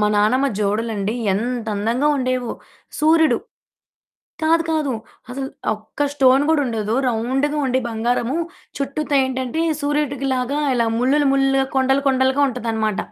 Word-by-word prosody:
మా 210 - +3
నానమ్మ 255 +7 +3
జోడులండి 210 +1 -1 0.2
ఎంతందంగా 230 +3 -1
ఉండేవో. 255 -2 -1 0.5
సూర్యుడు 320 +1 +4 1.0
కాదు, 330 +1 +3
కాదు. 300 -4 0 0.4
అసలు 265 +1 -4 0.3
ఒక్క 215 +7 -3
స్టోన్ 270 0 +4
గూడుండదు. 230 -8 0
రౌండుగా 265 +6 0
ఉండి 260 +1 +1
బంగారము, 235 +4 -1 0.4
చుట్టూతా 280 +1 -1
ఏంటంటే 260 +4 -2 0.2
సూర్యుడికిలాగా 280 -2 -1 0.2
ఇలా 230 -1 +2
ముల్లులు 275 +3 +2
ముల్లులుగా, 270 0 +2
కొండలు 265 +1 +2
కొండలుగా 265 +1 +2
ఉంటదనమాట. 225 -4 -2
260 Hz, 110 wpm, -20 LUFS, 230-280 Hz, 1.0 s, సూర్యుడు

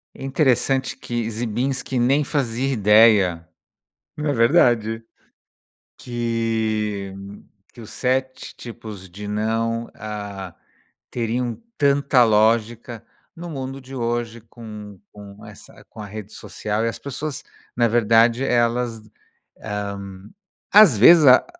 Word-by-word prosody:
É - - -11
interessante 135 -1 +1
que 120 -2 -4
ziembinski 125 +3 -2
nem 135 +5 +3
fazia 135 -2 -1
ideia. 105 -7 +4 0.7
É 150 -1 -1
verdade. 115 -2 +2 0.9
Que 110 -4 -2 0.6
que - - -16
os 110 - -11
7 130 0 -2
tipos 110 -5 -9
de 100 +4 -9
"não", 115 +2 -2
ah, 100 -4 -7 0.6
teriam 120 0 -2 0.2
tanta 140 -3 +3
lógica, 115 +1 +1 0.3
no 175 +1 -8
mundo 135 -2 -6
de 135 +1 -11
hoje 120 -1 -3
com 105 -3 -11
com 100 -1 -13
essa - - -15
com 110 - -11
a 105 - -7
rede 105 +1 -9
social 105 +1 -4
e - - +1
as 115 - -6
pessoas, 140 +1 -5 0.3
na 120 -1 +3
verdade, 115 +2 +3
elas, 120 -2 0 0.6
hã, 105 -1 -4 0.8
às 200 - +7
vezes, 155 +8 +7
a 130 0 +7
115 Hz, 115 wpm, -21 LUFS, 110-125 Hz, 0.9 s, às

